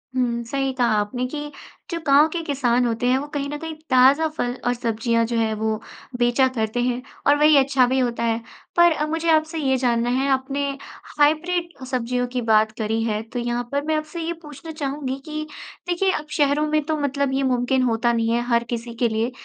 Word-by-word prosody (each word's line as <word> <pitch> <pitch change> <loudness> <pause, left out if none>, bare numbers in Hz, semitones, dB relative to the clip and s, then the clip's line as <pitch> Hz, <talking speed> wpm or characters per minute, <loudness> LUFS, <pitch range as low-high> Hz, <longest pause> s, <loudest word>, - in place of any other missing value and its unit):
हुँ, 235 -2 0
सही 270 +3 -1
कहा 250 -2 +1
आपने 245 +5 -2
कि 295 +2 -6 0.4
जो 335 - -2
गाँव 285 +2 +6
के 340 - -2
किसान 250 -4 +1
होते 235 +1 -1
हैं, 255 +1 +4
वो 285 +2 -4
कहीं 280 -1 -2
न 295 - -4
कहीं 320 0 -5 0.2
ताज़ा 265 +5 +5
फल 245 0 -1
और 245 - +3
सब्ज़ियाँ 230 -1 0
जो 235 0 -2
है 220 -1 +1
वो 220 0 -1 0.4
बेचा 240 +2 +3
करते 220 +2 -1
हैं 245 0 -1 0.3
और 285 - +6
वही 300 0 +6
अच्छा 270 -1 +4
भी 260 +1 +1
होता 235 -2 -1
है। 230 0 0 0.4
पर 345 0 +7
अ, 300 -1 0
मुझे 325 +2 -1
आपसे 315 +1 +2
ये 265 -3 +1
जानना 240 -2 +1
है, 260 +3 +1
आपने 275 +1 0 0.5
हाइब्रिड 325 0 +1
सब्ज़ियों 250 -1 -1
की 250 0 -3
बात 220 -1 +3
करी 220 0 -1
है, 215 -2 -1
तो 230 +2 -6
यहाँ 240 0 -1
पर 285 0 0
मैं 315 0 +1
आपसे 310 +2 -4
ये 330 +1 -2
पूछना 300 +1 -10
चाहूँगी 280 -3 -3
कि 310 0 -4 0.4
देखिए, 375 +2 +1
अब 305 - -3
शहरों 290 +1 +2
में 305 0 +1
तो 315 0 -1
मतलब 280 -1 -1
ये 270 +1 +1
मुमकिन 255 0 +1
होता 235 0 +1
नहीं 230 -1 0
है 235 - +1
हर 235 -1 +2
किसी 235 0 -5
के 235 +1 +1
लिए 225 +3 -1
260 Hz, 215 wpm, -22 LUFS, 235-295 Hz, 0.5 s, पर